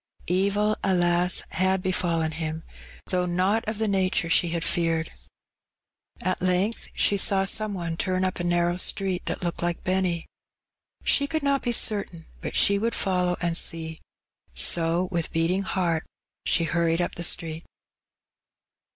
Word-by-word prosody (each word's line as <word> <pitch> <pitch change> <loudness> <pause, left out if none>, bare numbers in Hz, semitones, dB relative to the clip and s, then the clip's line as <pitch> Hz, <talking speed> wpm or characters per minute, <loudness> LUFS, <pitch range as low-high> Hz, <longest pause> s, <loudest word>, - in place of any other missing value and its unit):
Evil, 200 +4 +1
alas! 175 -1 +2
had 190 +2 +1
befallen 170 -4 0
him, 160 0 -4 0.4
thongh 180 -1 -1
not 195 +5 +2
of 215 - -4
the 220 0 0
nature 185 -4 +1
she 175 - +3
had 165 0 -1
feared. 165 -2 +1 1.1
At 185 +1 -1
length 185 +5 0
she 200 - +2
saw 195 0 +2
some 215 0 -1
one 170 -2 -4
turn 185 +1 0
up 185 - -2
a - - -1
narrow 175 0 +1
street 190 0 0
that - - -2
looked 170 -1 -3
like 175 -1 -2
Benny. 185 -2 0 0.8
She 280 - +3
conld 315 0 -2
not 280 -1 +2
be 245 - -1
certain, 200 -7 0 0.2
but - - -5
she 200 0 +4
would 230 +2 -1
follow 180 -2 0
and 170 -1 +1
see; 160 -1 -2 0.5
so 165 - +3
with 170 -2 -2
beating 165 +4 +1
heart 175 -4 -1 0.4
she 170 - +4
hurried 165 0 +1
np 175 - -1
the 170 - -5
street. 160 -1 -1
180 Hz, 150 wpm, -25 LUFS, 170-195 Hz, 1.1 s, she